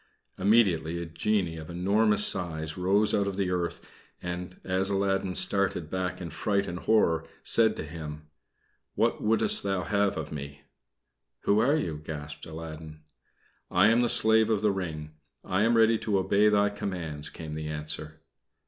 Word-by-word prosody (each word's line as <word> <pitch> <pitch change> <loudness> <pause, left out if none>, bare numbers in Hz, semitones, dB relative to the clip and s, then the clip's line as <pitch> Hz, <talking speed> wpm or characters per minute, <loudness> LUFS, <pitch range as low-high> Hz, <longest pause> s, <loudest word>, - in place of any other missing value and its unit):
Immediately 95 -5 +2
a 85 - -4
genie 85 +1 -1
of 80 -1 -9
enormous 105 +4 +3
size 80 -3 -1
rose 100 +4 +2
out 100 -1 +1
of 100 - -3
the 95 -2 -1
earth, 90 -1 -3 0.3
and, 90 0 -6
as 95 +1 0
Aladdin 95 -1 -1
started 95 -5 0
back 95 -1 -3
in 85 -4 -7
fright 100 +4 -1
and 90 +1 -6
horror, 85 -8 +2 0.2
said 115 -1 +3
to - - -5
him: 75 -1 -8 0.7
"What - - 0
wouldst 160 - +3
thou 95 -2 -2
have 100 +3 0
of 80 -1 -5
me?" 70 -1 -8 0.8
"Who 100 +1 +2
are 135 +7 +3
you?" 80 - -3
gasped 75 -1 -8
Aladdin. 80 -1 -9 0.7
"I 105 - +4
am 115 +2 +3
the 120 - +1
slave 110 0 +6
of 110 -2 +1
the 105 - +3
ring. 80 -5 -5 0.3
I 95 +2 -1
am 115 +2 +3
ready 115 0 +4
to 105 -3 0
obey 100 +3 +3
thy 105 -1 +2
commands," 85 -7 -3
came 80 -2 -8
the 75 0 -5
answer. 75 0 -5
90 Hz, 165 wpm, -27 LUFS, 80-105 Hz, 0.8 s, slave